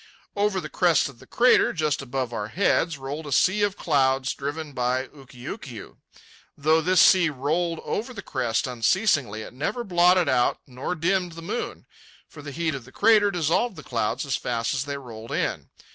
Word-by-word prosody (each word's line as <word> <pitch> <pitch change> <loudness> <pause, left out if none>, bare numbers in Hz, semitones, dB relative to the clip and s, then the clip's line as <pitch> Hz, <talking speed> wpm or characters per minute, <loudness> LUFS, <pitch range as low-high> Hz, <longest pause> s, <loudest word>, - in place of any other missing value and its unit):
Over 205 -1 +1
the - - -6
crest 170 -6 +2
of 130 -4 -15
the 130 - -16
crater, 250 +1 +4
just 155 -4 0
above 130 -2 -3
our 105 -2 -3
heads, 170 - +1
rolled 145 +3 -6
a - - -6
sea 190 +9 +3
of 205 -1 0
clouds, 135 -3 +1
driven 145 +3 -5
on - - -16
by 125 +1 -1
Ukiukiu. 130 -4 -10 0.6
Though 155 +3 +3
this 185 +3 +3
sea 180 -4 +6
rolled 160 +5 -1
over 230 +5 -3
the 210 -6 -8
crest 120 -7 -1
unceasingly, 125 - +1
it - - -11
never 195 - -3
blotted 180 -3 +4
out 125 -3 +2
nor 130 +7 -4
dimmed 180 +1 0
the 165 0 -9
moon, - - -4 0.4
for - - -12
the 145 - -8
heat 160 +2 -2
of 135 -4 -7
the 130 - -15
crater 210 +2 +4
dissolved 180 +5 0
the 155 - -10
clouds 115 +3 -2
as 135 - -1
fast 115 -1 -2
as 135 +1 -2
they 140 -1 -4
rolled 115 -4 -10
in. - - -2
145 Hz, 190 wpm, -25 LUFS, 130-180 Hz, 0.6 s, sea